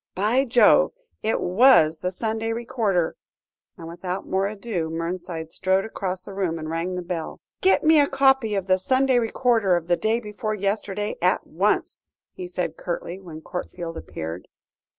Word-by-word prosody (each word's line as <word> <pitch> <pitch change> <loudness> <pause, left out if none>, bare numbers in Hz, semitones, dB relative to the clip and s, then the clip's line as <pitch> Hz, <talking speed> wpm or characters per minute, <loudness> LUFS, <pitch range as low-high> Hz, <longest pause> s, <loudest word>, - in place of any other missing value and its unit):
by 220 +8 +2
Jove! 245 - +5 0.3
it 220 - 0
was 180 -6 +5
the 180 - -1
Sunday 225 +3 -2
Recorder," 220 -7 0 0.6
and 165 -2 -9
without 180 +2 -5
more 190 +1 +1
ado, 200 -5 -3
Mernside 165 0 -4
strode 190 +3 +1
across 190 -4 -4
the 200 - -9
room 185 -4 -1
and 155 0 -5
rang 170 +3 -2
the 180 - -4
bell. 170 -2 -5 0.2
"Get 380 - +4
me 315 0 +6
a 285 - +4
copy 270 -5 +3
of 195 -2 -1
the 185 0 +2
Sunday 260 +4 +2
Recorder 225 -4 +2
of 170 -2 -2
the 175 0 +2
day 220 +2 +1
before 215 -1 -4
yesterday, 205 +1 -2
at 180 +3 +2
once," 190 +7 0 0.3
he 365 -1 -7
said 360 - -3
curtly, - - -4
when 165 -4 -10
Courtfield 175 -1 -6
appeared. 80 - -7
195 Hz, 165 wpm, -24 LUFS, 175-230 Hz, 0.6 s, me